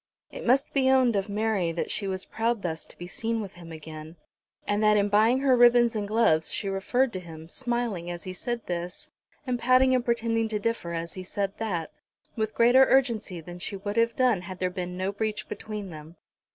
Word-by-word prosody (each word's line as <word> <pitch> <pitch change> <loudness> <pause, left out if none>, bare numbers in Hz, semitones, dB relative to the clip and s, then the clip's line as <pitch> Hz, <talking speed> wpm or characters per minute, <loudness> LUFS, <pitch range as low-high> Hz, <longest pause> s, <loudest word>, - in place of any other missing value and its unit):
It - - -7
must 270 +3 +3
be 265 -2 +3
owned 260 -4 +4
of 200 +1 -1
Mary 205 -4 0
that 165 - -3
she 200 - -1
was 190 -1 -3
proud 230 -1 -1
thus 160 -2 -3
to - - -15
be 175 - -7
seen 225 +5 -3
with 200 -4 -6
him 170 -1 -12
again, 155 0 -9 0.5
and 205 +1 0
that 210 0 +5
in 205 0 +2
buying 220 +5 +4
her 270 -2 +4
ribbons 240 -1 +5
and 205 -1 -2
gloves 205 -8 +2
she 200 - -1
referred 235 +6 0
to 185 - -3
him, 160 -2 -10
smiling 235 -5 -2
as 175 -1 -6
he 185 - -6
said 235 +5 -4
this, 180 - -5 0.3
and 250 -2 -1
pouting 255 +1 +4
and 250 -1 +2
pretending 230 -1 0
to 215 -1 -2
differ 230 -5 -2
as 170 0 -4
he 185 - -7
said 195 +1 -3
that, 180 -8 -2 0.4
with 220 -1 -2
greater 245 +3 +6
urgency 230 -10 +1
than 175 +2 -10
she 195 - -3
would 205 +1 -4
have 230 0 +2
done 245 -7 +2
had 185 +1 -8
there 185 0 -1
been 180 -1 -5
no 190 +1 -1
breach 215 +1 -3
between 210 -3 -6
them. 155 +1 -11
210 Hz, 215 wpm, -27 LUFS, 180-235 Hz, 0.5 s, greater